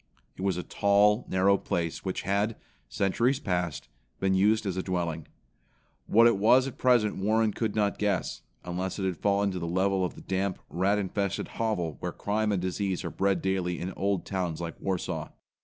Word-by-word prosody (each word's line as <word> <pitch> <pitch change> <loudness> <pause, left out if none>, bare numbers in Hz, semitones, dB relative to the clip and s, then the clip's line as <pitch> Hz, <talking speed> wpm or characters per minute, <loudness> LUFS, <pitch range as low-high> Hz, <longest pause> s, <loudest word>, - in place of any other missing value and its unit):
It - - -9
was 95 -2 0
a 90 - -3
tall, 105 +2 +3
narrow 95 +1 +3
place 85 -2 -2
which 95 - -3
had, 100 +3 0 0.3
centuries 120 +7 +1
past, 90 - -2 0.3
been 95 0 +2
used 105 +3 +3
as 95 -3 -1
a 95 - -1
dwelling. 85 -4 -3 0.8
What 115 +2 +6
it 115 -4 +5
was 125 +6 +5
at 135 - -7
present 120 -5 +3
Warren 110 +2 +2
could 110 -3 -2
not 105 -2 +1
guess, 100 -3 -1 0.2
unless 90 +1 -3
it 95 - -2
had 95 -2 0
fallen 100 0 +1
to 90 - -4
the 85 - -3
level 95 +2 +1
of 90 - -2
the - - -11
damp, 95 0 -1
rat 95 +4 +2
infested 100 0 -2
hovel 95 -9 -2
where - - -3
crime 105 +1 -1
and 100 - +1
disease 95 +1 -2
are 85 - -3
bred 95 -3 0
daily 95 -2 -1
in 90 +2 -4
old 100 -2 -1
towns 90 -5 -2
like 85 -2 -4
Warsaw. 95 -3 -2
95 Hz, 190 wpm, -28 LUFS, 90-105 Hz, 0.8 s, What